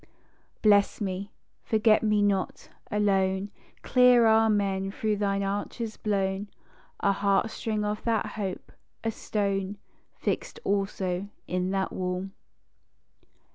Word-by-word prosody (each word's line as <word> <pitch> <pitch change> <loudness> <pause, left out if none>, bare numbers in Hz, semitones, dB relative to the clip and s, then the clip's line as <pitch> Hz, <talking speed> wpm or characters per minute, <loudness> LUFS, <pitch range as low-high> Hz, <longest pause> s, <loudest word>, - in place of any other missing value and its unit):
Bless 205 -2 +4
me; 200 0 -3 0.3
forget 220 -1 +3
me 210 -1 +2
not: 195 -2 -1 0.2
a 210 - -1
lone 195 -1 +1 0.3
Clear 250 -2 +6
Amen 205 -3 +3
through 210 +1 -1
thine 200 -1 0
arches 205 +3 -3
blown, 195 -1 -1 0.5
A 200 - +3
heartstring 210 +2 0
of 210 0 -2
that 225 -3 0
Hope, 195 -3 -5 0.3
a 225 - 0
stone 200 -2 -2 0.4
Fixed - - -3
also 195 -1 -1 0.2
in 180 0 -1
that 195 0 -1
Wall. 185 +1 -3
200 Hz, 110 wpm, -27 LUFS, 195-215 Hz, 0.5 s, Clear